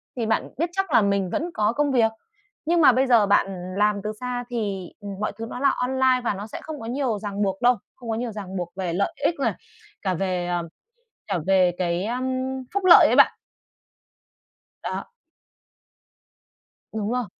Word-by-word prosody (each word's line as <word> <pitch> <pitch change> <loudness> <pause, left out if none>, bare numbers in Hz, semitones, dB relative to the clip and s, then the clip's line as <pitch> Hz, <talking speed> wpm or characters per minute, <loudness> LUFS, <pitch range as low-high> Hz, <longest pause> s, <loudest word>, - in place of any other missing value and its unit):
thì 240 -3 -2
bạn 220 0 0
biết 335 +3 0
chắc 385 -4 -1
là 235 - +6
mình 200 -2 +1
vẫn 330 - -2
có 215 +2 +1
công 290 0 +1
việc. 225 -3 +3 0.5
Nhưng 335 +1 +3
mà 265 - +8
bây 260 +2 +2
giờ 235 -4 +5
bạn 200 0 +3 0.3
làm 210 -1 +2
từ 215 - -2
xa 250 -1 -3
thì, 200 -6 -3
ừm, 205 -1 -7
mọi 215 - -1
thứ 225 - -5
nó 245 - -6
là 275 0 +4
online 260 0 +1
và 220 - 0
nó 200 +2 -6
sẽ - - -8
không 310 -2 -7
có 225 - -8
nhiều 240 -3 -1
ràng 205 0 -4
buộc 195 -1 -1
đâu, 245 -1 +4 0.2
không 240 -3 -10
có 225 - 0
nhiều 235 0 -3
ràng 195 -2 -7
buộc 175 -1 -4
về 185 -3 -3
lợi 200 +3 0
ích 335 - +2
này, 275 - +1 0.5
cả 190 -2 0
về, 180 -1 -1
ờ, 175 -2 -2 0.6
cả - - 0
về 185 -2 +4
cái, 175 +1 -1
ưm, 250 +3 -2 0.5
phúc 400 -1 -1
lợi 355 - +9
ấy - - +2
bạn. - - +5 1.5
Đó. - - -4 1.9
Đúng 215 0 -3
rồi. 250 -1 -1
220 Hz, 195 wpm, -24 LUFS, 195-255 Hz, 1.9 s, lợi